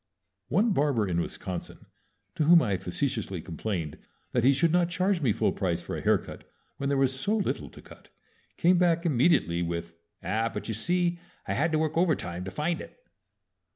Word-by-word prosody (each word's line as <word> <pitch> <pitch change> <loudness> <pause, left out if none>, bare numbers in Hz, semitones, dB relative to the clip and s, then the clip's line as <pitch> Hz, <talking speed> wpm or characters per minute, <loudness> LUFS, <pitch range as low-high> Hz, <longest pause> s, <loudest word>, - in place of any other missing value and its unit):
One 210 +8 +2
barber 135 - +1
in 85 -2 0
Wisconsin, 90 0 -6 0.5
to 155 - 0
whom 170 +2 +8
I 100 - 0
facetiously 100 0 -2
complained 85 -1 -4 0.3
that 120 - +1
he 130 - +6
should 145 +4 +2
not 175 0 +3
charge 180 +1 +1
me 130 -6 +3
full 110 - +1
price 90 -4 -1
for - - -6
a - - -4
haircut - - 0 0.3
when 140 - -2
there 140 - +1
was 135 -1 +2
so 210 +9 +1
little 205 - -2
to - - -14
cut, - - -16 0.5
came 175 +1 +4
back 170 -1 +2
immediately 125 - +3
with, 85 0 -3 0.3
"Ah, 110 +3 0
but - - -6
you 110 - -2
see 175 - 0 0.3
I - - 0
had 160 +3 +1
to - - +3
work 155 0 -1
overtime 90 - 0
to - - -4
find 155 - -2
it!" - - -12
140 Hz, 190 wpm, -28 LUFS, -, 0.5 s, whom